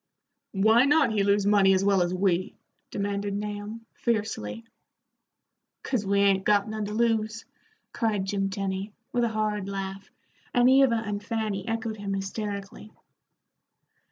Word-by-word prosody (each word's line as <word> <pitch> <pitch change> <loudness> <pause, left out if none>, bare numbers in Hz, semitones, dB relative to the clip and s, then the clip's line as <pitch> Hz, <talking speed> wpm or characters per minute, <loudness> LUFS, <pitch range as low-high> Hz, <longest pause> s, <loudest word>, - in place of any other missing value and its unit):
"Why 220 +6 +5
not 285 -4 +4
he 210 -2 +1
lose 200 0 +2
money 200 -2 +5
as 190 +1 +1
well 200 -2 +3
as 175 0 +1
we?" 185 0 0 0.3
demanded 200 0 -2
Nahum, 210 +2 -5
fiercely. 220 - -2 1.2
"'Cause 245 -6 -1
we 200 0 +3
'ain't 195 -1 +3
got 205 0 +3
none 215 -1 -3
to 210 - -5
lose," 225 -1 0 0.5
cried 210 -4 0
Jim 195 0 -1
Tenny, 195 +1 -3 0.2
with 240 -1 +2
a 235 - +2
hard 210 -2 -1
laugh, 195 0 -5 0.5
and 245 0 +5
Eva 260 -4 +4
and 205 -1 -4
Fanny 215 -2 -3
echoed 225 -1 -3
him 200 -1 -3
hysterically. 200 +1 -5
205 Hz, 140 wpm, -27 LUFS, 195-225 Hz, 1.2 s, Why